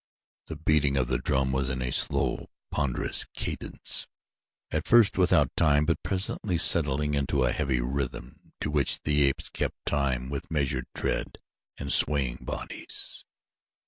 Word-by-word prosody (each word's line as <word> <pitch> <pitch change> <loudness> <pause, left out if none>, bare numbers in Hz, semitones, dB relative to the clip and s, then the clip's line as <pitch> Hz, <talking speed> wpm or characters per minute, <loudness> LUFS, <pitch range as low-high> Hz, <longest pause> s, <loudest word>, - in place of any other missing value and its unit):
The - - -6
beating 75 -2 +1
of 65 -2 0
the 65 - 0
drum 65 -2 0
was 65 0 -1
in 65 -1 -3
a 60 - -3
slow, - - +1 0.2
ponderous 70 -4 0
cadence, - - +1 0.6
at 75 +1 -3
first 115 -4 +5
without 90 -1 +2
time 75 -2 +3
but 85 +1 -1
presently 95 -1 -2
settling 75 -3 +4
into 70 -1 0
a 60 - +1
heavy 65 -3 -1
rhythm 65 0 -6
to 75 - -2
which 75 -2 0
the 75 0 +1
apes 70 -1 +1
kept - - -3
time 65 -3 -1
with 70 -2 -6
measured 70 -4 -2
tread - - -3 0.4
and 70 0 +3
swaying 70 -5 +4
bodies. - - -6
70 Hz, 145 wpm, -27 LUFS, 65-75 Hz, 0.6 s, first